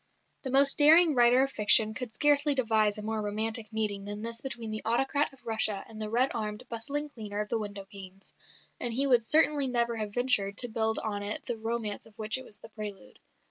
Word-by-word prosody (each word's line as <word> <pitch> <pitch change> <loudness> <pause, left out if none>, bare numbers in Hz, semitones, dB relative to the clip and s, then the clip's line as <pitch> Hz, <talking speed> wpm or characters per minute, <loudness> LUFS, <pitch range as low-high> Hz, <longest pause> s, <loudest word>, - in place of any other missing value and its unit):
The 265 - -5
most 275 +2 +3
daring 320 +2 +6
writer 245 +1 +5
of 270 - -2
fiction 215 +1 +5
could 245 0 -6
scarcely 290 +1 +3
devise 220 -4 +1
a 210 - -7
more 220 0 -3
romantic 215 +1 -3
meeting 210 -2 -2
than 205 +1 -6
this 230 0 -3
between 235 -4 -5
the 215 - -4
autocrat 270 +6 0
of 270 -2 -21
Russia 220 -3 +1
and 220 -1 -10
the 215 - -4
red 245 +4 +1
armed, 215 +1 -5
bustling 280 +6 -4
cleaner 210 -6 -7
of 210 0 -3
the 230 - -1
window 200 -2 -7
panes, 195 -1 -12 0.5
and 235 -2 -3
he 275 +3 +4
would 250 -4 +4
certainly 295 +2 +3
never 235 -2 0
have 210 -2 -5
ventured 205 -6 +1
to 245 - +2
build 220 0 0
on 205 -2 -3
it 205 +1 -5
the 240 - -3
romance 225 -1 -4
of 220 0 -22
which 220 +3 -1
it - - -10
was 210 - -11
the - - -14
prelude. 205 - -9
225 Hz, 220 wpm, -28 LUFS, 210-255 Hz, 0.5 s, daring